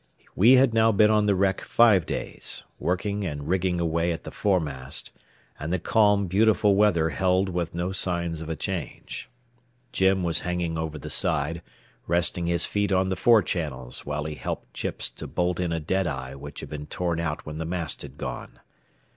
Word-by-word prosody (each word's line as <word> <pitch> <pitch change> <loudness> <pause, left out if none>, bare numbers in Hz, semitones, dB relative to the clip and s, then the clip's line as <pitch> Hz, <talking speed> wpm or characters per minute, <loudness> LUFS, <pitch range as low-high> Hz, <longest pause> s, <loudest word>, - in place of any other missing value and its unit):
We 115 +7 +6
had 130 -2 +5
now 115 0 +4
been 105 +1 +4
on 105 -1 +3
the 100 - +3
wreck 95 0 +1
five 105 -8 +4
days, - - -3 0.2
working 100 +3 -1
and 75 -5 -4
rigging 90 -1 +1
away 85 +1 0
at 80 - -5
the - - -7
foremast, 75 -10 -1 0.5
and 75 +3 -4
the 90 - +2
calm, 105 +2 +3
beautiful 105 +2 +3
weather 90 -6 +3
held 95 +1 +1
with 85 -2 -3
no 90 +2 -1
signs 85 -3 -1
of 80 - -6
a 80 - -2
change. 90 +2 -5 0.6
Jim 95 -4 +2
was 85 -2 +2
hanging 90 -2 -2
over 80 -1 -3
the 70 - -7
side, 75 +4 0 0.5
resting 85 0 +1
his 85 0 +2
feet 100 0 -1
on 95 0 +2
the 95 - 0
fore 110 +2 +5
channels 75 -7 -4
while 75 0 -3
he 80 0 -4
helped - - -6
Chips - - -2
to - - -8
bolt 90 0 -1
in 90 -2 -1
a 85 - -1
deadeye 75 -6 -2
which 70 +1 -9
had - - -8
been 75 -1 -6
torn 85 -3 -2
out 80 -2 -3
when 75 +1 -6
the - - -2
mast 85 -3 -3
had - - -9
gone. - - -6
90 Hz, 190 wpm, -26 LUFS, 80-95 Hz, 0.6 s, We